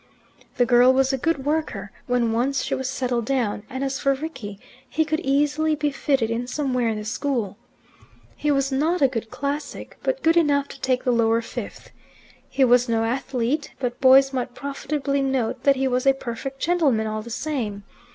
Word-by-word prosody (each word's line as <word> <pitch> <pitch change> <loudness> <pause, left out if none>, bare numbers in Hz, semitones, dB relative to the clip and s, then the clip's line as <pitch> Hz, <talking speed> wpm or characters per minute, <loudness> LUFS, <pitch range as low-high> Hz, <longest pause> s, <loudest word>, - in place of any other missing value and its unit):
The 245 - +4
girl 245 +1 +6
was 265 +1 +2
a - - +1
good 280 -1 -1
worker 290 -10 -2 0.2
when 245 -2 +1
once 255 +4 0
she - - -2
was 260 -1 -2
settled 250 -3 -1
down; 235 -6 0
and 260 0 -4
as 270 0 -2
for 275 -1 +2
Rickie, 260 -9 -7 0.3
he 315 +2 +1
could 310 +1 -1
easily 295 +3 +1
be 295 0 -1
fitted 270 -4 0
in 235 +2 -2
somewhere 255 -3 -1
in 220 - -2
the 210 - -6
school. 225 -3 -2 0.8
He 300 - -2
was 275 -1 +1
not 310 +5 +1
a - - +7
good 225 -3 -4
classic, 285 +2 -5
but - - -2
good 325 +1 +4
enough 285 -4 +3
to 275 - -11
take 255 -1 0
the 250 - +2
Lower 230 -1 +2
Fifth. - - -8 0.6
He 270 - +3
was 245 0 +4
no 225 -1 +1
athlete, 255 +3 -2
but 250 -1 -4
boys 270 +1 +6
might 250 -1 -3
profitably 280 +1 -2
note 265 -4 -1
that 280 -1 +5
he 265 0 0
was 255 +1 0
a 270 - +7
perfect 270 +2 -6
gentleman 295 -11 +2
all 215 0 -3
the 230 - -10
same. 230 -7 -3
265 Hz, 190 wpm, -23 LUFS, 240-280 Hz, 0.8 s, a